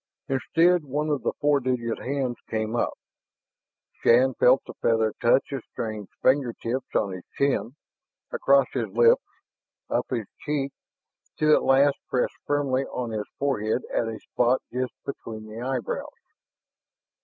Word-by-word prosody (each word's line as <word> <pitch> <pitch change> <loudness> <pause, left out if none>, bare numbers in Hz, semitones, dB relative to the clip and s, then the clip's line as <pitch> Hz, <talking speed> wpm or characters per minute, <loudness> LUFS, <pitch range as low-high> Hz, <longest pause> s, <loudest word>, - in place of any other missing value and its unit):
Instead, 165 +5 +3
one 150 +2 -2
of 145 -2 0
the - - -1
four 145 -1 +3
digit 125 -3 -1
hands 130 -2 -2
came 110 +1 -1
up. - - 0 1.1
Shann 130 +3 +5
felt 125 +2 +4
the - - -9
feather 110 -1 +2
touch 120 +4 +3
of 135 -4 -4
strange 110 -3 -5
finger 130 -3 +3
tips 125 +4 -4
on 100 - +1
his 90 -1 -7
chin, 130 -3 +1 0.6
across 140 0 +4
his 120 -4 -1
lips, 115 +3 +5 0.7
up - - 0
his 115 -4 -2
cheek, 140 -2 -2 0.7
to 155 0 +4
at - - +5
last 140 +1 +4
press 125 - +1 0.2
firmly 140 -2 +1
on 125 -3 -4
his 105 -1 -3
forehead 125 -4 0
at 115 - +1
a 110 -1 -4
spot 125 +1 +1
just 125 -2 -2
between 110 -5 -6
the 110 +2 -8
eyebrows. 125 -3 -2
125 Hz, 145 wpm, -26 LUFS, 115-140 Hz, 1.1 s, Shann